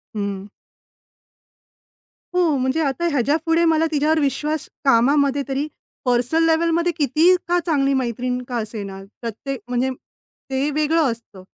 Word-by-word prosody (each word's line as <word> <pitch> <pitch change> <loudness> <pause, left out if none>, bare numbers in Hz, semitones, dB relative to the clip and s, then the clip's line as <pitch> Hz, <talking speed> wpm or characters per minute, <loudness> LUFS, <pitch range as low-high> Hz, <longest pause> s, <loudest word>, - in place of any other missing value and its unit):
हं. 200 -1 -4 1.9
हो, 345 -5 +3
म्हणजे 260 +5 0
आता 285 +4 0
ह्याच्यापुढे 320 +5 +1
मला 320 0 +3
तिच्यावर 310 +1 +2
विश्वास 300 +1 -1 0.2
कामामध्ये 280 +2 +3
तरी 275 +2 -1 0.4
पर्सनल-लेव्हलमध्ये 325 +7 +2
किती 315 +5 +4
का 350 0 +2
चांगली 275 -4 +2
मैत्रीण 250 0 -1
का 245 - -3
असे 215 -1 -4
ना, 195 -1 -8 0.2
प्रत्येक 240 +3 -5
म्हणजे 250 +1 0 0.6
ते 265 +2 0
वेगळं 305 -1 +2
असतं, 220 -5 -11
275 Hz, 120 wpm, -21 LUFS, 245-320 Hz, 1.9 s, किती